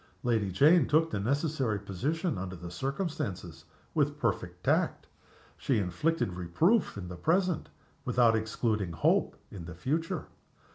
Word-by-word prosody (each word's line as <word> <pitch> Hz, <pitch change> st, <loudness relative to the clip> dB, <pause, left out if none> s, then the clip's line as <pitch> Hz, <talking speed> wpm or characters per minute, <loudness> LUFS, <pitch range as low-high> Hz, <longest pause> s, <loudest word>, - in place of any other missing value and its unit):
Lady 110 Hz, -5 st, +1 dB
Jane 150 Hz, -, +5 dB
took 160 Hz, +2 st, +3 dB
the 100 Hz, -, -1 dB
necessary 135 Hz, 0 st, 0 dB
position 135 Hz, -, -2 dB
under 95 Hz, 0 st, -5 dB
the 85 Hz, 0 st, -8 dB
circumstances 100 Hz, -, -4 dB, 0.3 s
with 145 Hz, -2 st, +1 dB
perfect 90 Hz, -8 st, -2 dB
tact. -, -, +1 dB, 0.5 s
She 130 Hz, -, 0 dB
inflicted 100 Hz, -, 0 dB
reproof 105 Hz, -, +1 dB
in 95 Hz, -3 st, -6 dB
the 90 Hz, -, -7 dB
present 175 Hz, -, +1 dB, 0.3 s
without 120 Hz, -2 st, +4 dB
excluding 110 Hz, -4 st, -1 dB
hope -, -, +2 dB, 0.2 s
in 90 Hz, -4 st, -8 dB
the 85 Hz, -1 st, -8 dB
future. 155 Hz, -, -2 dB
115 Hz, 135 wpm, -30 LUFS, -, 0.5 s, Jane